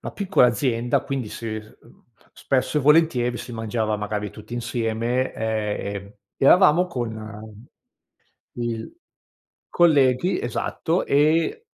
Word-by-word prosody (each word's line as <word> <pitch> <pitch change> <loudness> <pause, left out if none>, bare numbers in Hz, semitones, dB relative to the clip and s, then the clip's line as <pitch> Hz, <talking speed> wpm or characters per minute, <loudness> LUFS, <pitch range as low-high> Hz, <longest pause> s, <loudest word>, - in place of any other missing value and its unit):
la - - -7
piccola 195 -10 +3
azienda 120 0 0
quindi 135 -6 -4
si, 115 - -7
ehm, 110 0 -13 0.3
spesso 135 +3 0
e - - 0
volentieri 140 -5 +3
si 120 - -8
mangiava 110 -1 -2
magari 105 0 -4
tutti 110 +2 -10
insieme 120 +1 -1
e, 110 -2 -2
ehm, 100 +1 -8 0.2
eravamo 180 +4 +5
con 110 -4 -7 0.9
il 120 - -5 0.7
colleghi, 155 +1 +3
esatto 160 +8 -2
e 160 - +2
120 Hz, 110 wpm, -23 LUFS, 110-145 Hz, 0.9 s, eravamo